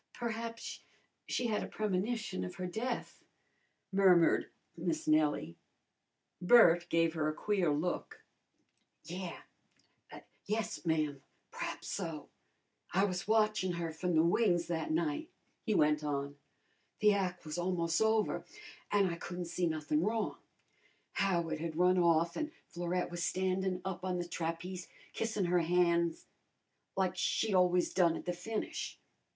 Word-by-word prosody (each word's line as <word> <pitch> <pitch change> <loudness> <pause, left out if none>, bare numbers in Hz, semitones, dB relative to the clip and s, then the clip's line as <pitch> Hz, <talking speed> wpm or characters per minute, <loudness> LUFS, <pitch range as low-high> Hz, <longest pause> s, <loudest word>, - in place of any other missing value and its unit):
Perhaps 230 0 -4 0.5
she 250 - -1
had 220 -3 0
a - - -4
premonition 215 - -2
of 90 - -6
her 185 - -4
death," 230 +7 -4 0.7
murmured 185 -3 +5 0.3
Miss 165 -2 -2
Nellie. 155 - +2 0.8
Bert 175 -4 +6
gave 165 -1 +2
her 155 -2 0
a - - -2
queer 195 -4 +1
look. 155 +5 -2 0.8
"Yeah 180 0 -6 1.1
yes, 215 -3 -2
ma'am, 155 -4 0 0.3
p'raps - - -5
so. 165 -6 -4 0.6
I 190 +2 +3
was 185 -2 -3
watchin' 215 -4 +2
her 170 -1 -3
from 175 +2 -1
the 160 - +5
wings 175 -1 +3
that 165 -2 -2
night," 160 - -1 0.3
he 215 -3 0
went 150 -1 +3
on. 140 -1 -2 0.6
"The 210 0 +6
ac' 185 -3 -2
was 155 +3 -4
almos' 175 -1 0
over, 220 -1 +2 0.5
an' 205 -1 +4
I 170 -2 -1
couldn't 175 +1 -5
see 175 +1 -1
nothin' 155 -1 0
wrong. 215 +3 -1 0.7
Howard 170 -5 0
had 160 -1 -4
run 180 +1 +4
off 170 -1 +3
an' 310 0 -2
Florette 175 +1 -2
was 175 0 -4
standin' 185 0 0
up 190 -1 -4
on 185 -1 -1
the 175 - -2
trapeze 175 +2 -4 0.3
kissin' 220 -4 -1
her 175 0 +3
ban's 170 -1 +2 0.7
like 185 -1 +1
she 200 +4 0
always 180 -1 +3
done 170 -3 +4
at - - -9
the 180 - -1
finish. 210 +5 -4
180 Hz, 135 wpm, -33 LUFS, 165-195 Hz, 1.1 s, Bert